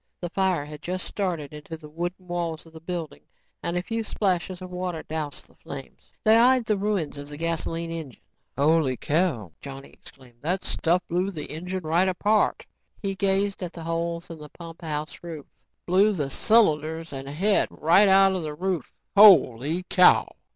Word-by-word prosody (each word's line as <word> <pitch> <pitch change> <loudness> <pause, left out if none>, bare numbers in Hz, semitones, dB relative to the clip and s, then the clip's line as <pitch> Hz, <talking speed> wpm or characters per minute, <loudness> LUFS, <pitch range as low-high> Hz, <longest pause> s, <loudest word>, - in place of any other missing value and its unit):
The 175 -1 -5
fire 185 -6 +1
had 150 0 -10
just 185 +1 -4
started 170 -8 -3
into 150 +2 -8
the 155 -1 -12
wooden 175 +4 -5
walls 170 -2 -3
of 165 - -17
the 160 - -10
building 165 - -5 0.4
and 170 - -2
a 180 - -1
few 225 +3 -2
splashes 185 -4 -1
of 185 -1 -9
water 180 -2 -4
doused 155 -2 -5
the - - -24
flames. 135 -1 -10
They 220 +1 +6
eyed 250 +1 +5
the 215 - +1
ruins 195 -8 -2
of 145 0 -8
the 145 - -8
gasoline 165 0 -2
engine. 160 -8 -7 0.3
"Holy 145 -2 +3
cow," 145 - 0
Johnny 135 -1 -9
exclaimed, 125 -3 -17
"that 180 +5 -1
stuff 175 +2 +1
blew 180 +3 0
the 155 -7 -7
engine 180 +4 -4
right 170 +4 +2
apart." 210 +4 +1 0.3
He 195 -1 -2
gazed 195 +1 0
up 180 - -2
at 170 - -16
the 165 - -8
holes 170 +1 -3
in 165 - -9
the 150 0 -10
pumphouse 160 -2 -6
roof. 165 -4 -8 0.4
"Blew 195 +4 +4
the 145 -7 -3
cylinders 160 -7 +2
and 135 0 -6
head 190 +9 +2
right 175 +6 +4
out 195 0 +6
the 155 -3 -5
roof. 180 -3 -2 0.2
Holy 165 - +6
cow!" 180 0 +5
170 Hz, 180 wpm, -25 LUFS, 150-185 Hz, 0.4 s, They